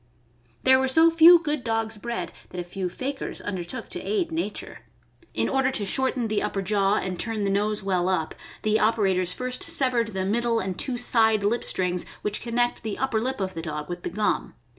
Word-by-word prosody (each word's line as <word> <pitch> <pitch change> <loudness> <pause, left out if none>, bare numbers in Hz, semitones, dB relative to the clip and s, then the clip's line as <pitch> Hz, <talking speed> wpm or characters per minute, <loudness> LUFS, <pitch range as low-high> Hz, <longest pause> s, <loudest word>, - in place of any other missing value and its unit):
There 260 0 +6
were 265 - +1
so 320 +5 +5
few 330 +2 +8
good 300 -5 -3
dogs 225 -1 -1
bred 235 +2 -4 0.2
that 180 - -7
a - - -2
few 180 +1 -4
fakirs 270 +8 -5
undertook 180 -4 -5
to - - -5
aid 380 -6 -1
nature. 325 +1 -4 0.6
In - - +1
order 270 -1 +1
to 215 -6 -1
shorten 260 +2 +1
the 215 -1 0
upper 195 - -2
jaw 200 0 +2
and 185 -4 -3
turn 225 -3 -2
the 195 - 0
nose 210 +1 0
well 185 -2 0
up, 165 -4 -1 0.3
the 215 0 +2
operators 195 -5 +2
first 255 +5 -2
severed 240 -5 +2
the 190 0 -1
middle 230 +3 +1
and 190 -2 -3
two 255 -3 0
side 220 -3 +3
lip 225 +4 +1
strings 180 -1 0 0.2
which 210 0 -2
connect 240 +1 0
the 220 -2 -4
upper 250 -5 0
lip 260 +1 -2
of 190 -1 -2
the 165 - -5
dog 150 -1 -5
with 175 0 -5
the - - -3
gum. 205 +4 -1
220 Hz, 205 wpm, -25 LUFS, 190-255 Hz, 0.6 s, few